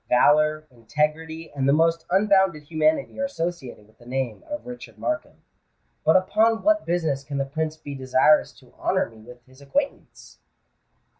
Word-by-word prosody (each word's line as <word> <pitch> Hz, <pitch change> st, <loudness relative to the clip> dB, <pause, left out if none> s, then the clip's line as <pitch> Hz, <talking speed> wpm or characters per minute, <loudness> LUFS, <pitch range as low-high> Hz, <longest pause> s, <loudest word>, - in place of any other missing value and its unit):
"Valour, 155 Hz, +4 st, +4 dB
integrity, 155 Hz, +7 st, -3 dB
and 135 Hz, -1 st, 0 dB
the -, -, +5 dB
most 165 Hz, +1 st, +2 dB
unbounded 190 Hz, -4 st, +3 dB
humanity 155 Hz, -, 0 dB
are 275 Hz, -, +1 dB
associated 170 Hz, -, -5 dB
with 110 Hz, -, -27 dB
the 120 Hz, -, -17 dB
name 130 Hz, -3 st, -3 dB
of 295 Hz, 0 st, -5 dB
Richard 245 Hz, 0 st, -10 dB
Markham. 310 Hz, -1 st, -4 dB, 0.6 s
But 160 Hz, -, +4 dB
upon 220 Hz, +4 st, +3 dB
what 320 Hz, +1 st, +2 dB
business 160 Hz, -5 st, 0 dB
can 140 Hz, 0 st, -5 dB
the 135 Hz, -, 0 dB
Prince 155 Hz, +2 st, -3 dB
be 145 Hz, -2 st, -8 dB
desirous 130 Hz, +3 st, +3 dB
to -, -, -21 dB
honour -, -, 0 dB
me 110 Hz, -1 st, -16 dB
with 120 Hz, +1 st, -14 dB
his 130 Hz, +1 st, -20 dB
acquaintance?" 275 Hz, -, -4 dB
155 Hz, 160 wpm, -24 LUFS, 135-175 Hz, 0.6 s, the